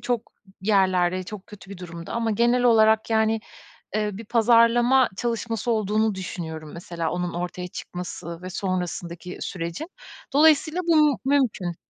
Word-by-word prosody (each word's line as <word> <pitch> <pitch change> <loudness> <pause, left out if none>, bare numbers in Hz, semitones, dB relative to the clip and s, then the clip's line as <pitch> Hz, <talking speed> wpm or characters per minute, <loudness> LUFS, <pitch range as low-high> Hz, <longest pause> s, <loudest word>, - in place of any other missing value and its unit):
çok 240 -2 -3 0.3
yerlerde, 185 -2 +2
çok 195 +1 -9
kötü 200 -2 -13
bir 200 - -8
durumda 170 -2 -8
ama 230 -1 0
genel 240 +3 +2
olarak, 220 -2 +4
yani, 220 0 +2 0.6
eee, 210 -1 +1
bir 220 +4 -8
pazarlama 235 +3 +4
çalışması 230 -1 -2
olduğunu 215 -1 +1
düşünüyorum 160 -4 -6
mesela 170 -1 -4
onun 180 0 -2
ortaya 180 +1 -4
çıkması 175 -1 -7
ve 185 - -6
sonrasındaki 180 -1 -4
sürecin. 170 - -5 0.4
Dolayısıyla 310 +3 +4
bu 300 -5 +4
mümkün. 245 -11 +1
210 Hz, 130 wpm, -24 LUFS, 180-235 Hz, 0.6 s, olarak